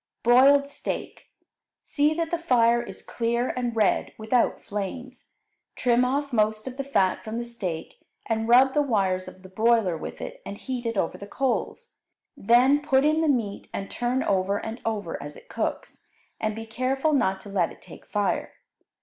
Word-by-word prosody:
Broiled 275 +4 +6
Steak 285 - -6 0.6
See 300 +1 +1
that 330 0 -2
the 340 - 0
fire 240 -7 +3
is 240 - -9
clear 235 +1 -1
and 245 -2 -2
red, 215 -3 +1
without 220 +2 +1
flames. 210 +6 -6 0.4
Trim 245 0 +3
off 280 +2 -1
most 215 -1 +1
of 260 0 -7
the 275 - -2
fat 195 -9 +1
from 220 +1 -5
the 240 - -2
steak, 190 -9 -5 0.3
and 225 0 -1
rub 260 +2 +6
the 295 - +3
wires 195 -8 0
of 185 - -12
the - - -10
broiler 220 -2 +2
with 160 - -7
it - - -7
and 200 0 -7
heat 250 -1 -4
it 230 -2 -2
over 165 - -1
the 200 - -8
coals. 275 - -2 0.4
Then 250 +7 +4
put 270 -1 +3
in 310 +1 +3
the 320 - +2
meat 225 -7 -1
and 195 - -5
turn 245 +2 -1
over 195 +1 +1
and 225 +3 -6
over 205 -7 -3
as 145 +1 -8
it - - -17
cooks, - - -4 0.4
and 215 -1 -1
be 225 0 -6
careful 265 +6 0
not 190 -9 +2
to 205 - -11
let 185 -4 0
it - - -14
take - - -14
fire. 205 -1 -1
235 Hz, 185 wpm, -25 LUFS, 205-265 Hz, 0.6 s, Broiled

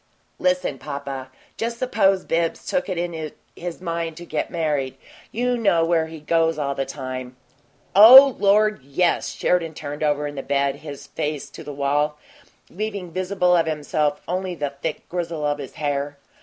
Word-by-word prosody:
"Listen, 275 0 0
papa. 140 -2 -6 0.3
Just 235 +1 -2
suppose 195 -7 +2
Bibbs 165 0 -1
took 275 -6 -1
it 185 - -2
into 165 -3 -3 0.2
his 175 0 -6
mind 165 -2 -3
to 175 - -8
get - - -2
married. 145 -6 -1 0.3
You 245 +2 0
know 195 -8 +3
where 165 -1 +2
he 160 0 -9
goes 165 +1 +1
all 140 -2 -1
the 135 -1 -3
time 130 -2 -6 0.3
" - - -36
"Oh, 255 +6 +10
Lord, 210 -1 +3
yes!" 140 +7 0
Sheridan 165 -3 0
turned 145 0 -6
over 150 -1 +1
in 145 - -4
the 135 - -4
bed, 140 0 0
his 145 -2 -9
face 150 -1 -4
to - - -10
the 150 - -7
wall, 145 +2 0 0.5
leaving 200 -3 -4
visible 180 0 +1
of 165 -2 +2
himself 150 -1 0
only 185 +1 -2
the 145 -3 -3
thick 140 +3 -5
grizzle 170 -3 -3
of 145 0 0
his 135 -3 -7
hair. 145 -1 -2
160 Hz, 170 wpm, -23 LUFS, 145-180 Hz, 0.5 s, Oh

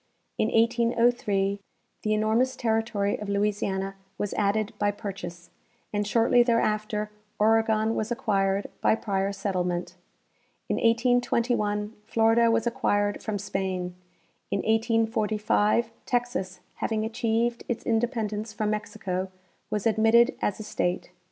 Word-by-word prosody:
In - - +3
1803 230 -4 +2 0.4
the 215 0 +1
enormous 225 +5 +2
territory 225 -3 0
of 210 - -6
Louisiana 200 -1 -1 0.2
was 205 - -2
added 210 +2 0
by 205 0 +2
jDurchase, 175 -4 -7 0.4
and 205 0 0
shortly 230 +2 +4
there 235 -1 +3
after 210 0 -1 0.3
Oregon 220 0 +3
was 220 +1 -2
acquired 195 -4 +1 0.2
by - - +4
prior 195 -3 -1
settlement. 180 -3 -2 0.7
In - - +1
1821 230 -3 +1
Florida 225 +1 +4
was 230 0 +2
acquired 205 -4 0
from 215 -1 -2
Spain. 190 -2 -3 0.6
In 200 - 0
1845 225 0 +1 0.2
Texas, 240 -7 -2 0.2
having 220 -1 -1
achieved 230 +1 0
its 240 - -3
independence 220 -2 -1
from 210 0 -1
Mexico, 195 -3 -3 0.4
was 210 -2 -2
admitted 225 +3 +4
as 205 - -1
a - - -5
state. 180 -3 -2
215 Hz, 120 wpm, -27 LUFS, 200-230 Hz, 0.7 s, shortly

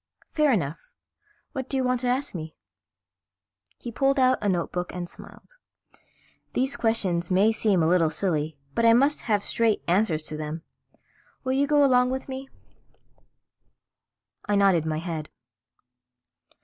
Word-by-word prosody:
"Fair 305 -3 +3
enough. 180 - -2 0.6
What 265 -1 -5
do 270 - -1
you 260 - +1
want 250 -1 +1
to 250 - -2
ask 255 +3 -1
me?" 160 -3 -7 1.2
He 240 - -7
pulled 275 +3 +1
out 255 0 +4
a 205 - +1
notebook 180 0 -2
and 175 -1 -4
smiled. - - -15 1.0
"These 265 +2 0
questions 195 -9 0
may 195 +4 +4
seem 205 -6 +2
a - - +3
little 170 -2 +3
silly 155 -3 -1 0.2
but 230 - 0
I 230 0 +7
must 275 +5 +3
have 205 -2 +2
straight 225 -1 +1
answers 175 -4 +1
to 155 - -6
them. 155 +1 -5 0.8
Will 260 0 -1
you 280 +2 +2
go 295 -1 +4
along 250 -2 +4
with 265 +1 -4
me?" 265 0 -7 2.0
I 205 - +1
nodded 190 -5 +3
my 155 -1 -1
head. 160 -2 -5
210 Hz, 150 wpm, -25 LUFS, 170-260 Hz, 2.0 s, I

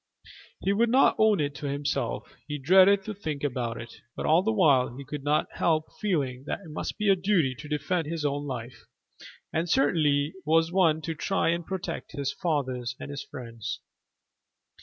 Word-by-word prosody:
He 195 - +1
would 230 +3 +2
not 260 +3 +5
own 215 -2 +4
it 145 -1 0
to 145 - -4
himself 140 -7 -2
he 150 -1 -3
dreaded 190 +7 +5
to 215 - -5
think 155 -8 -5
about 120 -4 -2
it 115 - -10
but - - -4
all 160 +3 +5
the 220 +4 +1
while 140 - +3
he 140 - -8
could 145 0 -6
not 150 +1 +2
help 155 -2 0
feeling 140 -11 -1
that - - -3
it 165 -5 -11
must 150 - -4
be 210 - -1
a 195 - +6
duty 180 -8 +2
to 150 - -9
defend 155 +2 -1
his 160 -1 -3
own 145 0 -1
life, 125 -2 -7 0.7
and 165 +2 0
certainly 150 - +2
was 160 +2 +3
one 165 -4 +3
to 165 - -2
try 190 +3 0
and 170 0 -1
protect 190 -3 -5
his 140 -2 -2
father 135 -7 -1 0.2
and 145 - -7
his 145 0 -5
friends. 115 -2 -6
150 Hz, 185 wpm, -27 LUFS, 140-180 Hz, 0.7 s, a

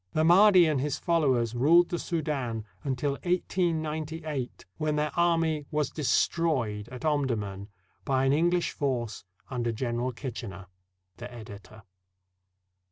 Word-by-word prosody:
The 155 - +2
Mahdi 185 +2 +7
and 150 -4 +1
his 145 +1 -1
followers 130 -9 +1
ruled 165 +8 +5
the 175 - -2
Soudan 135 -9 -2 0.2
until 140 0 -1
1898, 160 -5 -2
when 155 -1 0
their 150 0 0
army 165 -4 +1
was 150 -2 -1
destroyed 130 -8 0
at 125 +3 -8
Omdurman 110 -10 -1 0.3
by 135 -1 +1
an 135 - +3
Eng 170 +4 +3
Ush 175 - 0
force 120 -7 -3 0.3
under 120 -2 -1
General 120 +2 -2
Kitchener. 115 -7 -7 0.5
The 120 +1 -8
Editor. 110 -2 -11
140 Hz, 125 wpm, -28 LUFS, 120-160 Hz, 0.5 s, Mahdi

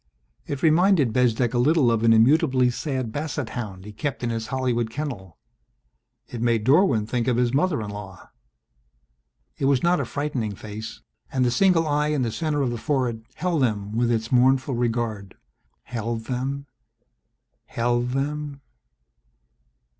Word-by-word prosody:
It 140 -2 -4
reminded 160 - +4
Bezdek 120 -1 +2
a 120 - +1
little 140 -1 +4
of 115 -1 +1
an 115 - +5
immutably 125 +2 +4
sad 130 -3 -3
Bassett 145 -2 -3
Hound 100 -6 -6
he 105 - -8
kept 140 +4 -4
in 120 - 0
his 115 -1 -3
Hollywood 125 -3 -1
kennel. 115 - -6 0.9
It 120 - -7
made 115 -2 +1
Dorwin 135 - +4
think 120 +1 -2
of 125 -2 +2
his 125 0 +1
mother 150 -4 +1
in 105 - -6
law. 100 -2 -10 1.3
It - - 0
was 135 -2 +2
not 175 +1 +3
a - - -1
frightening 135 -8 -3
face 110 +2 -8 0.3
and 130 -2 +1
the 120 - +2
single 175 +3 +3
eye 150 0 +1
in 150 -3 0
the 115 - -1
center 150 +1 -1
of 125 - 0
the 120 - -4
forehead 125 -6 -1
held 170 -2 0
them 105 -5 0
with 120 +1 +2
its 115 0 -1
mournful 130 +2 +3
regard, 115 -5 -2 0.5
held 115 -1 -4
them, 135 +3 -3 1.0
held 120 +1 0
them 140 +1 -3
125 Hz, 155 wpm, -24 LUFS, 115-145 Hz, 1.3 s, an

